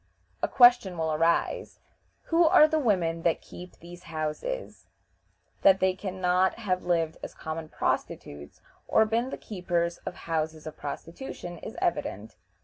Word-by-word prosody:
A - - +2
question 240 -8 +5
will 160 -1 0
arise: 165 +2 0 0.5
"Who 335 +1 +4
are 310 -1 +7
the 315 0 +1
women 175 - +1
that 165 -1 +1
keep 180 +1 -11
these 175 +1 -12
houses?" 155 - -4 0.7
That 195 -1 +6
they 190 0 +3
can 190 0 -6
not 180 +1 +2
have 185 -5 -1
lived 165 -2 0
as - - -8
common 160 0 -6
prostitutes, 70 - -3 0.3
or 220 - +4
been 230 +4 0
the - - -5
keepers 175 -4 -2
of 180 - -7
houses 160 -3 -3
of 155 -1 -7
prostitution, 170 - -7
is - - -8
evident. 105 -1 -2
175 Hz, 145 wpm, -28 LUFS, 160-205 Hz, 0.7 s, are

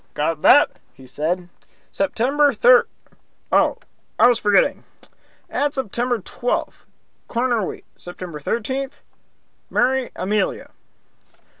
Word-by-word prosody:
"Got 155 +1 -1
that?" 290 +3 +5 0.2
he 130 - -15
said. 165 +7 -3 0.4
"September 285 +2 +1
thir 485 -1 +5 0.6
Oh, - - +3 0.4
I - - +6
was 245 -2 +3
forgetting! 205 -1 +2 0.6
Add 290 0 -1
September 245 -1 -1
twelfth, 240 +4 -4 0.4
corner 240 -2 0
wheat. - - -6
September 175 -3 -7
thirteenth, 260 - -3 0.7
marry 255 +1 +1
Amelia." 200 +1 -2
240 Hz, 100 wpm, -21 LUFS, 185-265 Hz, 0.7 s, I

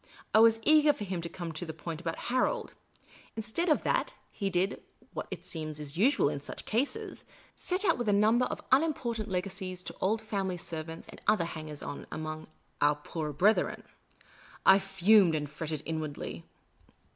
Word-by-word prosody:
I 220 - +7
was 225 0 +6
eager 305 +1 +6
for 210 - -6
him 185 -3 -3
to 170 - -5
come 170 -2 -6
to 155 +2 -5
the 160 -2 -6
point 160 +1 -6
about 165 -2 -3 0.2
Harold. 255 - +1 0.6
In 220 - -3
stead 335 +11 0
of 305 - +3
that, - - 0 0.2
he 200 -2 -2
did 185 +1 0 0.3
what - - -4
it - - -7
seems 155 -2 -5
is 150 0 -6
usual 230 - +4
in 145 -1 -2
such - - -7
cases 245 +6 -2 0.2
— - - -27
set 370 +3 -1
out 355 - +3
with 240 -3 0
a - - +5
number 215 +5 +4
of - - -5
unimportant 255 -7 +1
legacies 185 -1 -2
to - - -7
old 215 +4 +2
family 195 -4 -2
servants 160 -1 -6
and - - -12
other 190 -6 +4
hangers 155 -3 -6
on - - -6
among 155 0 -5 0.2
" - - -40
our 145 0 +5
poorer 150 +1 -4
brethren." 200 +10 +2 0.8
I 190 +1 +8
fumed 195 -2 +4
and 150 -1 -1
fretted 155 0 -5
inwardly. 155 -2 -4
185 Hz, 185 wpm, -30 LUFS, 155-220 Hz, 0.8 s, I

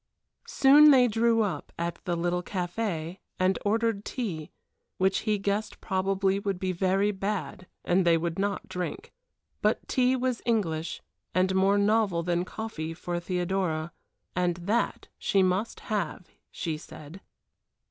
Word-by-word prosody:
Soon 290 +3 +7
they 255 -3 +7
drew 225 0 +3
up 175 -8 -4
at 170 0 -3
the 175 - 0
little 175 +1 0
café 180 -2 -3 0.2
and 185 +1 +2
ordered 220 0 +1
tea, 185 - -4 0.5
which 190 +1 +2
he 210 - +3
guessed 205 +2 -2
probably 195 0 0
would 200 -2 -2
be 185 0 -1
very 190 +3 +1
bad 195 -2 -4 0.2
and 185 +2 +3
they 170 -1 +4
would 170 +2 -3
not 200 0 -1
drink. 180 -1 -5 0.5
But - - +1
tea 255 0 +2
was 255 -2 -1
English, 170 -9 -1 0.3
and 185 +1 +3
more 195 +2 +3
novel 200 -4 +2
than 175 +1 0
coffee 165 -8 -5
for 175 +1 -3
Theodora, 175 -2 -1 0.4
and 180 -1 +1
that 220 +6 0
she 195 -1 +2
must 185 +5 0
have, 200 -3 -3 0.2
she 155 -2 -4
said. 155 +5 -11
190 Hz, 140 wpm, -28 LUFS, 175-210 Hz, 0.5 s, Soon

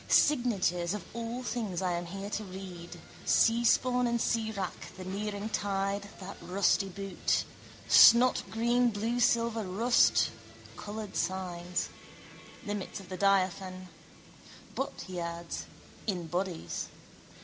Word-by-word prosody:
Signatures 200 - +3
of 205 - -6
all 235 +2 -4
things 220 -7 -2
I 185 -1 0
am 175 0 -2
here 195 +3 -6
to 215 - -2
read, 185 -3 -9 0.2
seaspawn 240 +2 +3
and 235 0 +1
seawrack, 220 -5 -2
the 185 - -7
nearing 205 +2 -3
tide, 200 -1 -1
that 195 +1 -8
rusty 195 +1 +2
boot. 195 +1 -1 0.4
Snotgreen, 240 0 +6
bluesilver, 230 +1 +1
rust: 220 +6 +3 0.4
coloured 210 -1 -7
signs. 180 -2 -2 0.8
Limits 205 -2 -4
of 190 -3 -12
the 185 - -5
diaphane. 185 -1 +1 0.8
But 270 - -3
he 185 -2 -5
adds: 170 0 -5 0.4
in 180 -5 -1
bodies. 175 +1 -3
200 Hz, 110 wpm, -30 LUFS, 185-230 Hz, 0.8 s, Snotgreen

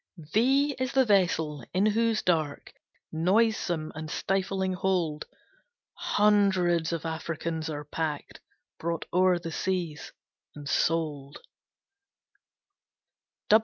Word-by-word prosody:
V 155 -2 -14
V 270 +5 +3
is 260 0 -2
the 265 -1 +4
Vessel, 165 - +1
in 190 +3 +3
whose 225 +1 +2
dark, 155 -5 -1 0.4
Noisome, 175 -2 +1
and 155 0 -6
stifling 190 +1 -1
hold, 180 -5 -1 0.7
Hundreds 190 -5 +2
of 165 -1 -3
Africans 160 0 -3
are 150 -1 -5
packed, 150 0 -4 0.4
Brought 170 0 -2
o'er 185 0 +4
the 165 -1 -6
seas, 175 -3 -3 0.4
and 145 -1 -8
sold. 150 -3 0
170 Hz, 100 wpm, -28 LUFS, 155-195 Hz, 0.7 s, the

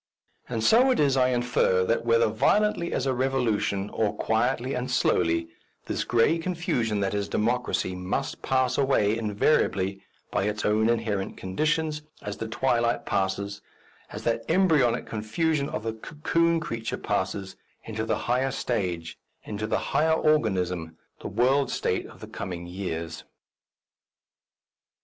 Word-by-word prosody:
And 115 -3 -2
so 245 - +5
it 255 - +2
is 140 -3 +3
I 130 -1 +4
infer 120 -7 +2
that, 115 +4 +1
whether 115 0 +4
violently 170 - +2
as 130 - -1
a 135 - +1
revolution 120 -6 0
or 110 -2 0
quietly 120 +3 0
and 125 +1 -3
slowly, 85 -8 +1 0.4
this - - -2
grey 120 +8 +3
confusion 165 - -1
that 100 0 0
is 100 -1 -2
Democracy 120 -4 0
must 90 0 -3
pass 130 -1 +1
away 115 -6 +3
inevitably 100 -3 +1 0.3
by - - 0
its 105 0 -2
own 110 +2 +3
inherent 110 -4 -1
conditions, 155 - -1 0.2
as 105 0 -5
the 115 - -4
twilight 120 0 +1
passes, 100 +1 -1 0.5
as - - -7
the 115 0 0
embryonic 160 -10 +3
confusion 140 +7 -1
of - - -4
the 115 -1 -2
cocoon 165 +7 0
creature 115 -7 -4
passes, 95 -1 -2 0.3
into 110 -1 -4
the 110 - 0
higher 125 +2 +1
stage, 90 -10 -3 0.2
into 110 0 -4
the - - +1 0.2
higher 160 +1 +3
organism, 90 - +1 0.2
the - - -6
world 130 +6 +2
state - - -1
of - - -15
the - - -8
coming 90 -3 -6
years. 85 -3 -5
115 Hz, 140 wpm, -26 LUFS, 100-135 Hz, 0.5 s, so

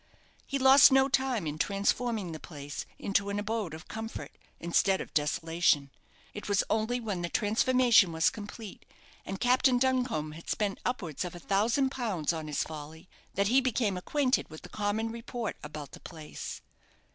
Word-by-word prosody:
He 275 - -1
lost 270 +1 +8
no 265 0 +5
time 265 -7 0
in 150 0 -4
transforming 200 0 0
the 160 - -6
place 145 -3 -7
into 200 0 0
an 200 - -2
abode 205 -5 -2
of 160 - -12
comfort, 225 0 -7 0.2
instead 190 +3 +2
of - - -7
desolation. 150 -1 +1 0.4
It 210 - -7
was 200 -1 +3
only 225 +3 +1
when 205 -6 -3
the 175 - -2
transformation 225 -1 +4
was 160 0 +2
complete, 210 -1 -9 0.4
and 195 0 -4
Captain 250 +1 +4
Duncombe 250 - 0
had 165 +2 -11
spent 205 -2 -1
upwards 175 - -2
of 180 -1 -6
a - - -8
thousand 230 - +1
pounds 205 - -1
on 160 -2 -5
his 150 - -1
folly, 160 +2 -9 0.3
that 200 +1 +2
he 260 +3 +5
became 235 -6 0
acquainted 260 +8 0
with 155 0 -11
the - - -10
common 215 +2 -1
report 235 -1 -5
about 150 -1 -8
the - - -11
place. 155 -3 -8
205 Hz, 170 wpm, -30 LUFS, 165-245 Hz, 0.4 s, lost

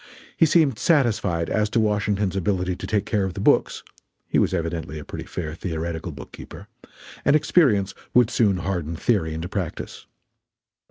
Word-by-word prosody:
He 165 - +4
seemed 145 -8 +3
satisfied 110 - +2
as 105 0 0
to 115 - +1
Washington's 105 -2 0
ability 90 -1 0
to - - -7
take 105 -1 0
care 105 -2 0
of 95 -2 -3
the - - -5
books, - - +2 0.4
he - - +2
was - - +2
evidently 80 -4 -3
a 75 - -8
pretty - - -7
fair 80 -3 -5
theoretical 80 0 -4
bookkeeper, 70 -4 -11 0.6
and 145 - +4
experience 135 - +3 0.2
would 125 -2 +4
soon 100 -5 +2
harden 85 -3 -3
theory 80 -5 0
into 80 +2 -4
practice. 90 -3 -5
95 Hz, 160 wpm, -23 LUFS, 85-110 Hz, 0.6 s, He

